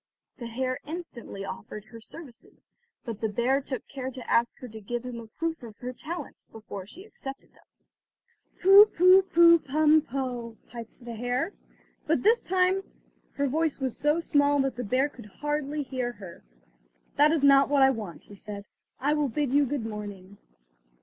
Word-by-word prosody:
The 235 - -5
hare 255 +3 -2
instantly 290 - -7
offered 200 +2 -8
her 230 -2 -12
services, 265 -1 -12 0.3
but 230 -4 -6
the 220 - 0
bear 245 +6 +1
took 265 -2 -6
care 260 -2 -5
to 255 -1 -9
ask 235 0 +2
her 250 - -9
to 220 -1 -10
give 240 +4 -4
him 245 -2 -5
a 230 - -10
proof 325 +8 -4
of 225 -3 -11
her 250 +1 -6
talents, 310 +3 -7
before 205 -3 -8
he 355 - -11
accepted 275 -10 -9
them. - - -24 1.0
"Pu, 390 +3 +9
pu, 370 0 +6
pu, 340 -2 +6
pum, 310 +2 +4
poh," 245 -5 -4
piped 235 +1 -10
the 235 - -6
hare; 245 - -2 0.5
but 320 +1 +1
this 450 +4 +5
time 370 +1 +2 0.5
her 280 0 0
voice 315 +2 0
was 260 -3 -2
so 295 +3 +2
small 285 -3 +2
that 270 -2 -1
the 245 - -4
bear 255 +6 +2
could 240 -7 -13
hardly 295 +5 -3
hear 255 -3 -3
her. 195 -6 -12 0.7
"That 295 +1 +6
is 320 -3 +1
not 275 -1 +6
what 285 -2 +4
I 265 - +6
want," 215 -9 -6
he - - -15
said, 200 0 -8 0.3
"I 290 +3 +1
will 300 -2 +1
bid 285 +2 -1
you 285 -1 +4
good 265 -3 -2
morning." 205 -3 -8
265 Hz, 180 wpm, -27 LUFS, 230-300 Hz, 1.0 s, Pu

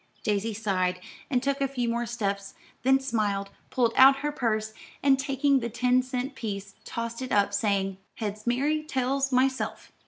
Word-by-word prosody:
Daisy 210 +1 0
sighed, 185 -4 0 0.3
and 255 -3 +1
took 280 0 0
a 275 - +3
few 250 -3 -2
more 235 +1 -1
steps, 200 -4 -3 0.3
then 265 +2 +4
smiled, 210 -6 -1 0.2
pulled 240 -3 +1
out 270 +1 +8
her 295 - +1
purse, 220 -5 -1 0.3
and 275 -1 +5
taking 275 0 +2
the 235 -1 -3
ten 250 +3 +2
cent 255 +1 -3
piece 200 -3 -5
tossed 230 +1 -4
it 255 - -5
up, 200 0 +3
saying, 195 -2 0 0.2
"Heads, 215 0 -5
Mary; 285 +6 +1
tails, 275 -2 0
myself." 260 +1 0
240 Hz, 165 wpm, -27 LUFS, 210-270 Hz, 0.3 s, out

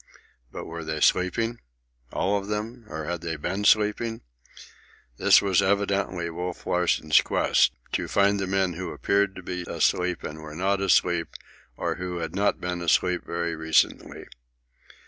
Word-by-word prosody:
But - - -7
were 85 0 -7
they 80 0 -3
sleeping? 115 +9 +1 0.5
all 100 +2 0
of 100 -1 -3
them? 110 +3 -4
Or 80 0 -5
had 85 0 -3
they 85 -1 -3
been 95 +7 -3
sleeping? 110 +2 +2 1.0
This - - +5
was 95 -1 +3
evidently 100 -2 0
Wolf 90 +1 -5
Larsen's 85 -3 +3
quest—to - - 0
find 100 0 +2
the 95 - -2
men 95 -1 +1
who 90 +2 -5
appeared 100 -1 +1
to 90 - -9
be 90 0 -4
asleep 90 -1 0
and 75 - -6
who - - -11
were 75 0 -9
not 95 +3 0
asleep 85 -3 +2 0.5
or - - -2
who 90 -1 -4
had 80 -2 -4
not 100 +2 +1
been 90 -1 -3
asleep 90 +1 +2
very 85 0 -2
recently. 80 0 0
90 Hz, 155 wpm, -26 LUFS, 85-100 Hz, 1.0 s, This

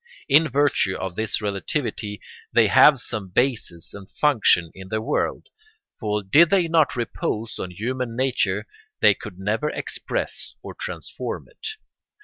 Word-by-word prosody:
In 155 +3 +5
virtue 135 -8 +2
of 95 -2 -4
this 110 +1 -2
relativity 105 +1 -3 0.3
they - - +5
have 145 -3 +7
some 110 -3 -3
basis 110 -6 -1
and 100 -1 -11
function 110 - +3
in 95 0 -11
the 110 - -1
world; 110 - -2 0.5
for 105 -2 -1
did 150 - +5
they 185 -4 +3
not 160 -3 +3
repose 115 -2 -3
on 90 - -4
human 115 +5 -3
nature 110 -6 0 0.4
they 105 - +7
could 100 -2 -10
never 105 +10 -1
express - - -4
or - - -7
transform - - -5
it. - - -9
110 Hz, 140 wpm, -23 LUFS, 100-135 Hz, 0.5 s, have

